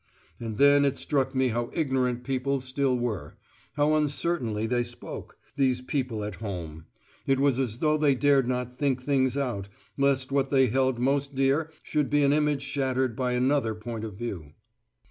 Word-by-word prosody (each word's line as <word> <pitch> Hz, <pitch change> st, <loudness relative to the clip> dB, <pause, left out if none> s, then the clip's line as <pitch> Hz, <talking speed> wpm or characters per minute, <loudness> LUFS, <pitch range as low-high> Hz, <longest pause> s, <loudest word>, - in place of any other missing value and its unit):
And 110 Hz, -3 st, -5 dB
then 140 Hz, +1 st, +6 dB
it 140 Hz, -1 st, +1 dB
struck 135 Hz, -2 st, -1 dB
me 130 Hz, -1 st, +2 dB
how 120 Hz, +1 st, -2 dB
ignorant 130 Hz, -5 st, 0 dB
people 135 Hz, +1 st, -1 dB
still 130 Hz, 0 st, 0 dB
were; 110 Hz, -12 st, -4 dB, 0.4 s
how 150 Hz, +1 st, +2 dB
uncertainly 145 Hz, -7 st, 0 dB
they 120 Hz, +2 st, +1 dB
spoke, 120 Hz, 0 st, -8 dB, 0.2 s
these 130 Hz, -3 st, +2 dB
people 125 Hz, -5 st, -2 dB
at 105 Hz, -3 st, -5 dB
home: 85 Hz, -7 st, -6 dB, 0.4 s
it 135 Hz, -1 st, +3 dB
was 135 Hz, -2 st, +2 dB
as 120 Hz, -4 st, -1 dB
though 155 Hz, +2 st, +2 dB
they 145 Hz, -3 st, +3 dB
dared 140 Hz, -1 st, +3 dB
not 125 Hz, -1 st, -2 dB
think 135 Hz, -2 st, 0 dB
things 130 Hz, -1 st, +1 dB
out, 120 Hz, -8 st, -2 dB, 0.3 s
lest 135 Hz, -1 st, +2 dB
what 135 Hz, -1 st, +1 dB
they 135 Hz, -1 st, +4 dB
held 130 Hz, +1 st, +1 dB
most 140 Hz, +2 st, 0 dB
dear 135 Hz, +4 st, +2 dB
should 150 Hz, -2 st, 0 dB
be 145 Hz, 0 st, +3 dB
an 140 Hz, 0 st, +4 dB
image 150 Hz, -2 st, +1 dB
shattered 130 Hz, -3 st, -1 dB
by 125 Hz, 0 st, -1 dB
another 125 Hz, -2 st, +1 dB
point 110 Hz, 0 st, -6 dB
of 110 Hz, -3 st, -6 dB
view. 95 Hz, -10 st, -6 dB
130 Hz, 175 wpm, -27 LUFS, 120-140 Hz, 0.4 s, then